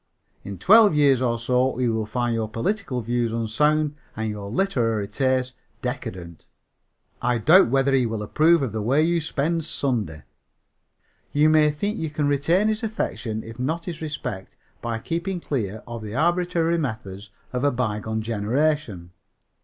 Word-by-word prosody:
In 100 -1 -7
twelve 210 - +6
years 140 -4 +4
or 120 -2 +1
so 125 +2 +1
he 125 -1 +1
will 110 -2 -1
find 120 0 -1
your 110 -1 -2
political 130 - -2
views 120 0 -1
unsound 145 +7 +1 0.2
and 110 0 -2
your 100 -1 -6
literary 115 - 0
tastes 130 +3 0 0.3
decadent. 85 -2 -6 0.7
I 120 0 +1
doubt 155 - +6
whether 135 +1 +2
he 130 -3 +3
will 110 -1 -3
approve 155 +7 +3
of 125 - -2
the 110 0 -3
way 135 +8 +2
you 170 +1 +1
spend 160 +2 -1
Sunday. 110 - -2 1.1
"You 150 +2 +4
may 155 -1 +5
think 205 +9 -2
you 160 - -2
can 150 -1 -1
retain 165 +8 +2
his 220 0 0
affection, 125 - -3
if 115 +1 -10
not 160 +6 -2
his 170 -3 -6
respect, 125 -11 -6 0.2
by 115 -1 -2
keeping 170 - -3
clear 110 - -3
of 120 -1 -7
the 105 +1 -6
arbitrary 170 +1 +1
methods 110 -7 -5 0.2
of 125 +1 -2
a 145 - +4
bygone 110 -3 -2
generation. 115 - -1
125 Hz, 160 wpm, -24 LUFS, 110-155 Hz, 1.1 s, twelve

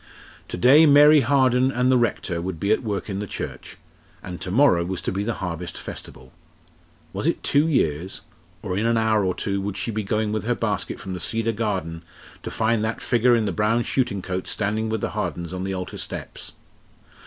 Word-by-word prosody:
To - - -5
day 145 - +7
Mary 150 +1 +7
Harden 130 0 +3
and 125 0 +2
the 130 - +5
Rector 95 -7 -1
would 90 -2 -4
be 100 +4 0
at 110 - +3
work 105 -5 -3
in 100 -2 -4
the 105 - -4
church, - - -7 0.5
and 90 -1 -7
to - - -4
morrow 100 -5 +4
was 90 +1 -4
to - - -2
be 100 +2 -2
the 115 +1 -2
Harvest 90 -2 -5
Festival. 65 +1 -9 0.8
Was - - -2
it - - -1
two 145 +3 +3
years? 90 - 0 0.4
or 95 -3 -3
in 105 +4 0
an 115 0 +2
hour 110 -2 +2
or 90 -1 0
two 100 0 -2
would 100 0 -4
she 115 - -2
be 110 0 -2
going 105 +1 -1
with 110 0 -2
her 120 +1 +1
basket 105 -4 -2
from 95 - -6
the 90 - -5
Cedar 115 +5 0
Garden, 95 -7 -3 0.4
to - - -6
find 110 0 0
that 110 +1 -2
figure 120 0 +3
in 115 -2 +1
the 100 - -1
brown 105 +6 +1
shooting 120 -9 -1
coat 95 0 -4
standing 110 +1 -1
with 110 -1 -2
the - - -2
Hardens 85 +1 -4
on 90 0 -4
the 95 0 -2
altar 90 -1 -5
steps? - - -7
105 Hz, 210 wpm, -23 LUFS, 95-115 Hz, 0.8 s, day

